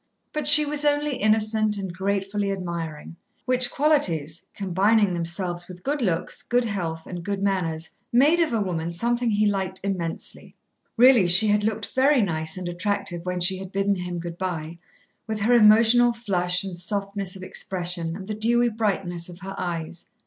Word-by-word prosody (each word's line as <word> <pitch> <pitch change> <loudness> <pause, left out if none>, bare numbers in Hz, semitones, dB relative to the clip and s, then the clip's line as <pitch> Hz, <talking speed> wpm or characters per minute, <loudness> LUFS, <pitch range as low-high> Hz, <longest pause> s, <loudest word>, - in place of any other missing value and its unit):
But 300 -2 -2
she 300 0 +8
was 295 0 -1
only 290 -2 +1
innocent 215 0 +2
and 190 -3 -5
gratefully 200 +1 -2
admiring, 170 -4 -6 0.3
which 255 -1 +3
qualities, 175 - 0
combining 200 +1 +2
themselves 175 +1 -2
with 180 -1 -12
good 285 +3 -2
looks, 180 -5 -1
good 245 0 0
health, 170 -6 -4
and 175 -2 -7
good 200 +1 -3
manners, 175 -5 -1 0.2
made 285 +8 +4
of 330 -3 +1
a 230 - 0
woman 170 -4 -3
something 235 +7 0
he 210 0 +2
liked 190 -2 -1
immensely. 185 -4 -5 0.4
Really 240 -5 +6
she 190 +5 +4
had 210 0 +2
looked 215 -1 -3
very 265 -1 +3
nice 160 -2 -2
and 180 -1 -5
attractive 175 -1 -2
when 180 0 -2
she 185 +2 +1
had 190 -1 -8
bidden 195 +1 +1
him 180 -2 -5
good 170 0 -7
by, 170 -3 -4 0.5
with 220 -1 -4
her 230 +4 +3
emotional 230 +2 +6
flush 180 -6 +1
and 185 -3 -6
softness 200 0 -2
of 190 - -10
expression 175 -3 -3
and 190 0 -8
the 215 - -4
dewy 240 +3 +2
brightness 195 -6 -2
of 175 +1 -12
her 195 +1 -6
eyes. 170 -1 -5
195 Hz, 170 wpm, -24 LUFS, 175-220 Hz, 0.5 s, she